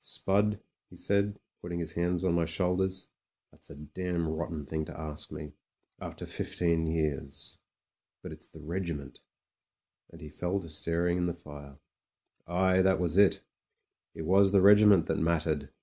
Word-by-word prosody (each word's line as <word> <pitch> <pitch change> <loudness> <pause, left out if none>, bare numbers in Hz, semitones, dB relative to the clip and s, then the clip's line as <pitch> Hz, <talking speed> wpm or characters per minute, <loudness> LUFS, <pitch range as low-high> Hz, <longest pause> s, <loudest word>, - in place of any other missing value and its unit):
"Spud," 105 +1 +1 0.3
he - - -14
said, 100 0 0 0.2
putting 85 0 -5
his 85 -2 -3
hands 90 +1 0
on 90 - +2
my 85 -1 +2
shoulders, 90 +2 0 0.4
"that's - - -13
a - - -10
damn 85 +3 -3
rotten 80 -1 -4
thing 80 +2 -2
to - - -9
ask 75 -2 -6
me 75 -2 -7 0.2
— - - -45
rafter - - -7
fifteen 85 -2 -1
years. 75 -4 -2 0.6
But - - -7
it's - - -9
the 80 - -13
regiment" 80 -4 -5 0.9
And 85 - -14
he 75 -2 -9
fell 90 +6 -2
to 85 - -9
staring 85 +3 +1
at 90 - +1
the 85 - -2
fire. 70 -4 -12 0.7
Aye, 95 +2 +3
that 95 0 +3
was 90 +1 +2
it 100 -2 +4 0.7
It 80 - -5
was 95 +4 +4
the 100 -2 +5
regiment 105 -3 +7
that - - -1
mattered. 80 -3 0
85 Hz, 165 wpm, -30 LUFS, 80-95 Hz, 0.9 s, regiment